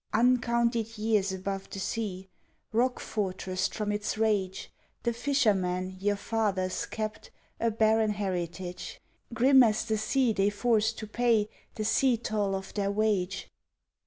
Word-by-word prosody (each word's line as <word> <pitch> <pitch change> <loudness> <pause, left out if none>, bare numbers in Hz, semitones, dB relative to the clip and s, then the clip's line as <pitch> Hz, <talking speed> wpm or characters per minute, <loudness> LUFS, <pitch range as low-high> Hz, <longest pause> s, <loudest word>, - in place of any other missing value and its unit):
Uncounted 235 -1 +2
years 210 -3 +1
above 195 +1 -4
the - - -7
sea, 190 -2 -3 0.5
Rock 250 +3 +2
fortressed 185 -2 -2
from 210 -2 -1
its 210 +1 -2
rage, 205 -4 0 0.3
The 235 - +1
fishermen, 195 -8 +1
your 205 +1 +1
fathers, 200 -4 -1
kept 215 0 -5 0.3
A 230 - +2
barren 220 0 +3
heritage 180 -2 -4 0.3
Grim 260 +4 +6
as 220 -3 +3
the 220 -2 0
sea 240 +2 +2
they 195 0 +2
forced 220 +1 +1
to 215 - -5
pay 225 -1 +2 0.3
The 215 - -3
sea 250 +2 +3
toll 210 -3 -1
of 190 0 -6
their 200 -1 0
wage. 200 -3 0
215 Hz, 135 wpm, -29 LUFS, 195-230 Hz, 0.5 s, Grim